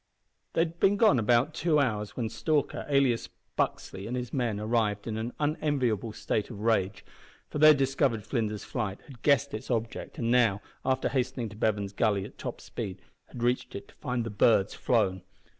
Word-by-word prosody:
They - - +3
had 165 0 -2
been 200 +1 +4
gone 200 - +5
about 120 +7 +3
two 160 -2 +2
hours, 105 -6 -1
when 120 -3 0
Stalker, 150 +6 -1
alias 135 -4 +2 0.3
Buxley, 95 +2 -2
and 125 +2 -2
his 125 -1 -5
men 120 -6 0
arrived 105 -2 0
in 115 - -3
an 110 +2 -3
unenviable 140 -8 0
state 105 0 -2
of 110 -5 -8
rage, 105 -4 +1 0.5
for 150 - -3
they 155 - +8
had 155 -1 +8
discovered 135 -4 +1
Flinders's 110 -2 -2
flight, 105 -5 -3
had 130 -5 -14
guessed 140 -1 +3
its 110 +4 -6
object, 115 -2 -3
and 115 -1 0
now, 115 -5 +4 0.2
after 130 0 +1
hastening 125 -2 -1
to 105 - -12
Bevan's 105 -2 0
Gully 100 -2 +1
at - - -13
top - - -5
speed, 95 -1 -6 0.3
had 120 - -7
reached 125 +1 0
it 100 - -7
to - - -18
find 125 -1 -2
the 115 - -5
birds 105 -1 +3
flown. 95 -7 +1
115 Hz, 190 wpm, -29 LUFS, 105-135 Hz, 0.5 s, they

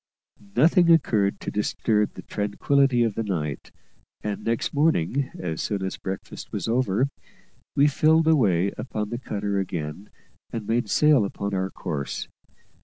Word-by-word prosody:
Nothing 170 - +5
occurred 110 -11 +3
to - - -4
disturb 105 0 0
the - - -9
tranquillity 120 +5 +1
of 115 -3 0
the 115 - -2
night; 80 -9 -3 0.5
and 105 -1 -3
next 115 0 -1
morning, 140 - +1
as 80 -3 -3
soon 100 -2 -2
as 95 - -4
breakfast 95 0 -7
was - - -3
over, 125 +1 +1 0.7
we 140 - +5
filled 155 +2 +4
away 100 - +3
upon 105 -2 -3
the 120 - -3
cutter 100 -4 -2
again 90 0 -4 0.4
and 115 -2 -4
made 115 0 0
sail 150 -3 +5
upon 100 0 -3
our 95 0 0
course. 75 -7 -4
105 Hz, 145 wpm, -25 LUFS, 95-135 Hz, 0.7 s, Nothing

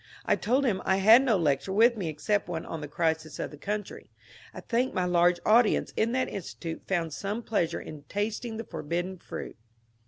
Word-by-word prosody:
I - - +3
told 260 +6 +1
him 195 -7 +1
I 190 - +2
had 220 +6 +7
no 240 -6 +2
lecture 155 +2 0
with 230 +5 +5
me 190 -7 -3
except 155 +7 -1
one 165 -2 -4
on 165 - -6
the 150 - -5
crisis 160 +1 -1
of - - -4
the 150 - -11
country. 205 +2 -5 0.4
I - - -9
think 245 +2 -1
my 185 - +1
large 175 0 +3
audience 225 +1 +4
in 225 +1 +1
that 260 0 +1
Institute 170 -3 -6
found 170 -5 -1
some 205 +8 -4
pleasure 200 -8 0
in 150 -2 -9
tasting 220 +2 -3
tiie 225 - -6
forbidden 175 +4 -4
fruit. - - -7
190 Hz, 195 wpm, -28 LUFS, 165-220 Hz, 0.4 s, had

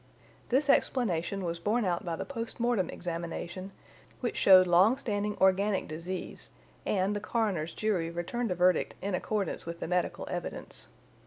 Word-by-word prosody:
This 275 +4 +2
explanation 195 -9 +1
was 170 0 -3
borne 215 +5 +1
out 175 -2 0
by 170 -2 -2
the - - -5
post 230 -4 -5
mortem 235 -6 +1
examination, 175 +2 -5 0.5
which 245 - -2
showed 185 -1 +7
long 185 +8 +5
standing 210 -5 -2
organic 190 +1 +3
disease, 170 +4 -5 0.4
and 195 +1 +1
the - - -1
coroner's 195 -9 -1
jury 190 -7 0
returned 175 +8 -3
a 180 - 0
verdict 180 +1 +2
in 200 0 -1
accordance 195 -1 -1
with 170 0 -5
the - - -4
medical 180 0 -1
evidence. - - -5
190 Hz, 155 wpm, -30 LUFS, 175-215 Hz, 0.5 s, showed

